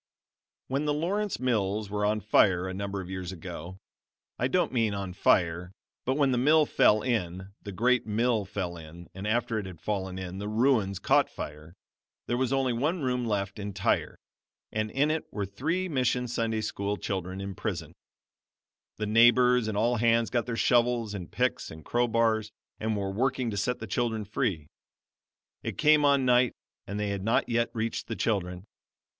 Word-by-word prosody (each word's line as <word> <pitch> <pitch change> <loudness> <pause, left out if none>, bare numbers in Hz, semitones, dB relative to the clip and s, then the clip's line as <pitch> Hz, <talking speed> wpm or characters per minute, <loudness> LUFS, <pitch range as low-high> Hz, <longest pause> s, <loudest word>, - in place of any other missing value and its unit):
"] - - -65
When 140 +3 -1
the 145 -1 +1
Lawrence 200 +6 -1
Mills 105 -4 0
were 105 0 0
on 105 0 0
fire 95 -3 +3
a 95 - -4
number 100 0 -3
of 90 - -9
years 95 -1 -4
ago 90 0 -8 0.6
I 125 - +2
don't 175 +1 +1
mean 115 -4 +1
on 95 -2 -4
fire, 90 -1 +2 0.3
but 130 - +1
when 140 -3 +3
the 125 - +1
mill 150 +4 +5
fell 110 -7 +4
in 95 -5 -2
the 100 - -7
great 120 +4 +2
mill 110 0 +1
fell 95 -3 -4
in, 85 +2 -11
and 95 +2 -5
after 115 0 0
it 100 - -5
had 90 -4 -10
fallen 95 -3 -3
in, 95 0 -6
the 100 - -4
ruins 110 -3 +2
caught - - +3
fire, 75 +3 -8 0.5
there 120 - -1
was 130 0 0
only 135 -2 +1
one 150 +7 -1
room 125 -2 0
left 100 -1 -2
entire, 100 -2 -1 0.5
and 110 0 -1
in 145 +6 +1
it 160 0 -3
were 100 -2 -2
three 160 - -2
Mission 125 -5 0
Sunday 115 -2 -1
School 105 -1 -2
children 95 -1 -4
imprisoned. 95 -4 -4 1.0
The 105 - -2
neighbors 120 +2 +5
and 105 -2 -2
all 120 +3 +2
hands 115 0 +2
got 120 -1 0
their 115 -2 -3
shovels 120 -3 +2
and 95 -4 -7
picks 125 0 -1
and 80 -1 -11
crowbars 115 -2 +1 0.3
and 110 -1 -1
were 100 -1 -2
working 125 +2 0
to - - -4
set 125 +5 0
the - - -6
children 110 0 -1
free. 100 - -1 1.0
It - - -5
came 150 -1 +5
on 140 -2 +4
night 125 0 +4 0.3
and 100 +2 -4
they 105 -1 -1
had 100 -1 -3
not 115 +3 +2
yet 120 0 +1
reached 115 0 -2
the 115 - -3
children. 90 -5 -1
110 Hz, 180 wpm, -28 LUFS, 95-125 Hz, 1.0 s, mill